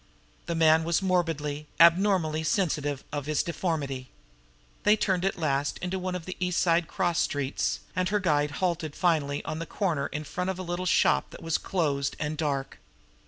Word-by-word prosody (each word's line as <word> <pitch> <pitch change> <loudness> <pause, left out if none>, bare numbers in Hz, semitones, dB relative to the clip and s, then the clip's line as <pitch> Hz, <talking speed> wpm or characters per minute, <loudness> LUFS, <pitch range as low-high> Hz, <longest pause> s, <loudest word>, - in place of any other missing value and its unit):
The 170 - -1
man 160 0 +5
was 170 +3 +1
morbidly, 155 -5 -1
abnormally 170 -2 +4
sensitive 150 -5 0
of 145 -1 -4
his 155 -1 +1
deformity. 145 -7 -3 0.7
They 210 - +5
turned 190 -4 0
at 195 - 0
last 140 -3 0
into 180 +1 -3
one 185 0 -3
of 175 -3 -5
the 185 - -5
East 180 -1 0
Side 170 -1 +2
cross 175 -3 0
streets, 140 -1 -1
and 185 0 +1
her 210 +1 +1
guide 150 -6 +2
halted 170 -5 -1
finally 150 -5 +1
on 155 - -4
a 165 - -5
corner 160 -9 -1
in 150 - -5
front 180 +5 -3
of 190 - -2
a 185 - -5
little 175 +1 -3
shop - - +3
that - - -12
was 165 -1 0
closed 145 -7 -1
and 150 0 -2
dark. 140 -3 -2
165 Hz, 180 wpm, -27 LUFS, 150-180 Hz, 0.7 s, man